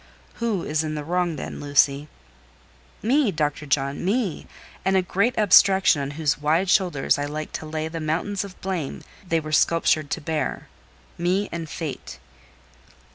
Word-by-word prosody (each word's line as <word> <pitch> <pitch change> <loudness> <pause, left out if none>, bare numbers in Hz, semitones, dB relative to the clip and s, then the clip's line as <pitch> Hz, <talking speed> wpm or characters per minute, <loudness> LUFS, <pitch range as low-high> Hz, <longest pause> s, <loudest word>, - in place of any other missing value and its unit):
"Who 220 -6 0
is 155 +1 0
in 155 0 -3
the 150 - -4
wrong, 175 +1 0
then, - - -6
Lucy?" 145 0 +2 1.0
"Me—Dr. 185 - +1
John—me; 155 - -1 0.4
and 190 0 +2
a 185 - +2
great 200 +7 0
abstraction 190 -5 +5
on 140 0 -3
whose 150 -3 0
wide 165 +5 +2
shoulders 175 -10 +2
I 145 - -1
like 155 +1 -5
to 155 - -6
lay 155 0 -3
the 165 +1 -5
mountains 170 +6 -1
of 195 -2 -11
blame 180 -7 -4 0.2
they 165 -3 0
were 155 -1 -7
sculptured 155 -1 +2
to - - -2
bear: 155 -2 -3 0.5
me 185 +4 0
and 165 -2 -5
Fate." 150 -1 -6
160 Hz, 150 wpm, -24 LUFS, 150-190 Hz, 1.0 s, abstraction